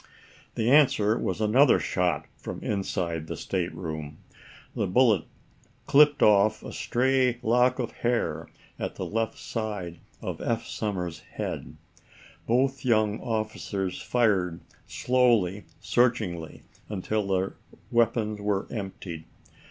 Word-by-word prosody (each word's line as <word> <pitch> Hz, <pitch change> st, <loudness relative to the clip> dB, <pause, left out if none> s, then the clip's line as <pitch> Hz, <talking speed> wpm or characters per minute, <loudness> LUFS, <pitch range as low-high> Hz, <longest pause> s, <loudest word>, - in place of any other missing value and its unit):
The 115 Hz, +2 st, +1 dB
answer 120 Hz, -7 st, +5 dB
was -, -, -2 dB
another 120 Hz, +6 st, +5 dB
shot 90 Hz, -1 st, 0 dB
from -, -, -7 dB
inside 85 Hz, -5 st, -2 dB
the -, -, -5 dB
stateroom. 80 Hz, -5 st, -4 dB, 0.6 s
The -, -, 0 dB
bullet 110 Hz, -3 st, +3 dB, 0.6 s
clipped 145 Hz, +1 st, +5 dB
off 105 Hz, +1 st, +4 dB
a -, -, -7 dB
stray 130 Hz, 0 st, +1 dB
lock 125 Hz, +2 st, +3 dB
of 125 Hz, -4 st, -3 dB
hair 120 Hz, 0 st, -1 dB, 0.3 s
at -, -, -4 dB
the -, -, -4 dB
left 115 Hz, 0 st, -2 dB
side 105 Hz, -7 st, -4 dB, 0.2 s
of -, -, -5 dB
Eph 115 Hz, -1 st, -1 dB
Somers's 90 Hz, -6 st, -3 dB
head. -, -, -6 dB, 0.7 s
Both 130 Hz, +3 st, +1 dB
young 110 Hz, -4 st, +2 dB
officers 110 Hz, -4 st, -3 dB
fired 95 Hz, -8 st, +1 dB, 0.3 s
slowly, 115 Hz, -6 st, +2 dB
searchingly, 105 Hz, -10 st, 0 dB, 0.3 s
until 105 Hz, +1 st, -2 dB
their 95 Hz, 0 st, 0 dB, 0.4 s
weapons 115 Hz, -2 st, +1 dB
were 100 Hz, -1 st, 0 dB
emptied. 95 Hz, -6 st, -6 dB
110 Hz, 115 wpm, -27 LUFS, 95-120 Hz, 0.7 s, answer